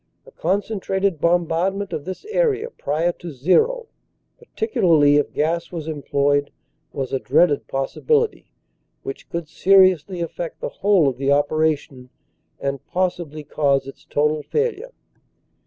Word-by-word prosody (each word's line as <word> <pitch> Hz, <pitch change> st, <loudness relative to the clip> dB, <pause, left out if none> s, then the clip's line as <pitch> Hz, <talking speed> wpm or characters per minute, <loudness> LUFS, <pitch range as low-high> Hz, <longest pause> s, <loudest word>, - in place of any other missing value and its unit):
A -, -, -15 dB
concentrated 195 Hz, -1 st, -1 dB
bombardment 175 Hz, +3 st, +1 dB
of 145 Hz, -, -4 dB
this 185 Hz, -, -7 dB
area 455 Hz, -1 st, +1 dB
prior 160 Hz, -, -1 dB
to 175 Hz, 0 st, -10 dB
"zero/ 440 Hz, -, +2 dB, 0.5 s
particularly 165 Hz, -, +2 dB
if 145 Hz, -, 0 dB
gas 165 Hz, +2 st, -1 dB
was 165 Hz, -3 st, -6 dB
employed, 145 Hz, -1 st, 0 dB, 0.4 s
was 135 Hz, -1 st, -4 dB
a 135 Hz, -, +1 dB
dreaded 150 Hz, -1 st, +2 dB
pos 135 Hz, 0 st, -2 dB
sibility 455 Hz, -1 st, +1 dB, 0.6 s
which 405 Hz, 0 st, -7 dB
could 170 Hz, -2 st, -4 dB
seriously 185 Hz, 0 st, +4 dB
affect 170 Hz, 0 st, -5 dB
the -, -, -3 dB
whole 195 Hz, -6 st, +3 dB
of 130 Hz, -2 st, -1 dB
the 135 Hz, 0 st, 0 dB
opera 155 Hz, +2 st, +3 dB
tion 130 Hz, -3 st, -15 dB, 0.5 s
and 140 Hz, -1 st, -3 dB
possibly 175 Hz, -4 st, -2 dB
cause 140 Hz, -2 st, +1 dB
its 135 Hz, -, -11 dB
total 150 Hz, +1 st, 0 dB
failure. 455 Hz, -, -2 dB
170 Hz, 135 wpm, -21 LUFS, 145-195 Hz, 0.6 s, seriously